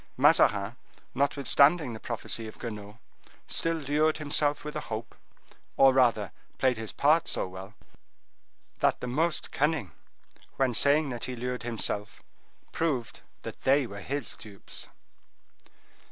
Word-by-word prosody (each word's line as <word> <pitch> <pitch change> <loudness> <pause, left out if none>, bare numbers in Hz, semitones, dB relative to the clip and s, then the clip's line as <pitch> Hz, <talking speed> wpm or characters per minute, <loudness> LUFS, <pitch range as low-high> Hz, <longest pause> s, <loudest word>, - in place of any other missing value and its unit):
Mazarin, 105 +3 +4 0.4
notwithstanding 140 +1 +3
the 110 - -7
prophecy 115 -1 -3
of 110 - -11
Guenaud, 105 -2 -7 0.5
still 165 0 +2
lured 155 +1 +1
himself 145 -1 +2
with 150 - -6
a - - -1
hope, 110 +1 -5 0.6
or 135 -1 +7
rather 115 -7 +2 0.3
played 130 -3 +2
his 110 -1 -5
part 155 +3 +3
so - - -1
well, 95 +3 -10 1.0
that - - +2
the - - -5
most 155 +7 0
cunning, 145 - 0 0.6
when 130 -2 +1
saying 145 +4 +4
that 120 -2 -4
he 125 - -5
lured 125 +1 -4
himself, 110 -2 -2 0.5
proved 140 -8 -2 0.2
that - - -8
they 135 +1 +3
were 100 -3 -8
his 140 +3 -2
dupes. 100 -2 -7
125 Hz, 130 wpm, -28 LUFS, 110-145 Hz, 1.0 s, or